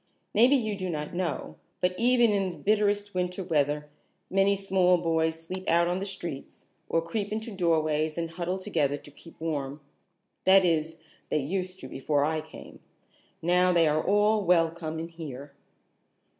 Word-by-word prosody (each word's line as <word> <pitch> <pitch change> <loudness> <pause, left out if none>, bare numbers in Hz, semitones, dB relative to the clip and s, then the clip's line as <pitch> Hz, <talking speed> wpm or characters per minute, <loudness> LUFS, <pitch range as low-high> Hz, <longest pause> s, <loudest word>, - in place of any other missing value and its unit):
Maybe 245 +6 +6
you 220 -5 0
do 185 -2 -4
not 150 -1 -4
know, 160 - -3 0.2
but 180 0 +1
even 240 +1 +4
in 195 -2 +1
the 175 - -8
bitterest 205 -1 +1
winter 180 +1 -2
weather 150 -2 0 0.4
many 195 +1 +3
small 190 -2 +3
boys 160 -1 0
sleep 185 +3 -5
out 170 +1 +4
in 180 +1 -1
the 195 - -4
streets 175 -7 -7 0.2
or 165 - +1
creep 200 +4 -3
into 220 +2 -4
doorways 155 -4 +1
and 165 -1 -3
huddle 175 +2 -3
together 155 -8 0
to 145 - -14
keep 165 +3 -15
warm. 145 -3 -3 0.6
That 190 0 +6
is, 160 -1 0 0.3
they - - +1
used 185 +5 -3
to 130 - -7
before 140 +2 0
I 155 0 -1
came. 155 0 -13 0.6
Now 180 +2 +4
they 170 -2 +4
are 155 +1 +1
all 210 +1 +3
welcome 165 -2 +1
in 165 +1 -5
here." 145 -4 -8
170 Hz, 165 wpm, -28 LUFS, 155-195 Hz, 0.6 s, Maybe